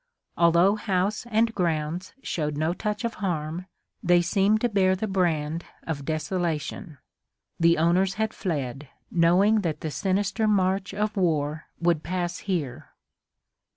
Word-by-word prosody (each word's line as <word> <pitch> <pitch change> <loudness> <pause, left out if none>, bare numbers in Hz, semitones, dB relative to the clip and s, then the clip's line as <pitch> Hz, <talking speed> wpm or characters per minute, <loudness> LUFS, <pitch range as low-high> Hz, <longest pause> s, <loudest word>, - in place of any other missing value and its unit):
Although 170 +4 +4
house 205 +2 -1
and 225 0 +2
grounds 170 0 -2
showed 150 -3 -2
no 160 +3 +1
touch 210 +3 -3
of 230 - -2
harm, 170 -1 -2 0.3
they 175 0 +4
seemed 200 +4 +2
to 240 - +2
bear 190 -3 +3
the 190 - -2
brand 170 -5 0 0.2
of 145 -4 -4
desolation. 160 0 -3 0.6
The 170 0 +4
owners 180 +4 +2
had 220 0 -1
fled, 140 - -3 0.2
knowing 185 +6 +4
that 160 -5 -2
the 155 - -3
sinister 200 +5 0
march 195 -1 +1
of 210 +1 -1
war 155 -5 0
would 170 -2 +2
pass 175 0 -3
here. 160 -11 -3
180 Hz, 135 wpm, -26 LUFS, 160-200 Hz, 0.6 s, Although